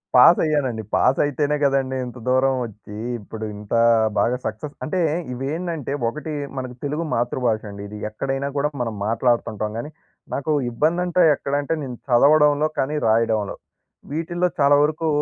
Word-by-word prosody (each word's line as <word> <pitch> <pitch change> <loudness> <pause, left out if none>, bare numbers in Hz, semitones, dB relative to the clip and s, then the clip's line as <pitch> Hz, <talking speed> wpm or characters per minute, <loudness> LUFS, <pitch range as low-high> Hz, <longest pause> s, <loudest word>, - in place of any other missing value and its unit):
Pass 125 +7 +8
అయ్యానండి. 135 -8 0
Pass 130 - +3
అయితేనే 145 +1 0
కదండీ! 135 -1 +1
ఇంత 125 0 -9
దూరం 130 +1 +3
వచ్చి 105 -1 -11 0.2
ఇప్పుడు 110 +1 -7
ఇంత 105 0 -8 0.5
బాగా 125 +1 +2
సక్సెస్ 110 +7 -4
అంటే, 180 +4 -1 0.3
ఇవి 130 +2 -4
ఏంటంటే 165 -5 -3 0.2
ఒకటి 150 +4 -6 0.2
మనకు 130 -1 -5
తెలుగు 150 +3 -2
మాతృభాష 120 -2 0
అండి. 100 0 -8
ఇది 105 - -8
ఎక్కడైనా 135 +5 -3
కూడా 145 +1 +1
మనం 115 -3 -2
మాట్లాడుతుంటాం 115 -2 0
కానీ, 145 +6 -6 0.4
నాకు 140 +3 -2 0.2
ఇబ్బంది 160 +8 +1
అంటే 180 0 +2
ఎక్కడ 140 0 -5
అంటే 145 - -1
నేను 125 -3 -6
చదవడంలో, 150 +4 +5
కానీ 145 +3 0
రాయడంలో. 110 -2 +1 0.6
వీటిల్లో 175 +3 0
చాలా 140 0 +6
వరకు 155 +2 0
135 Hz, 150 wpm, -22 LUFS, 115-150 Hz, 0.6 s, Pass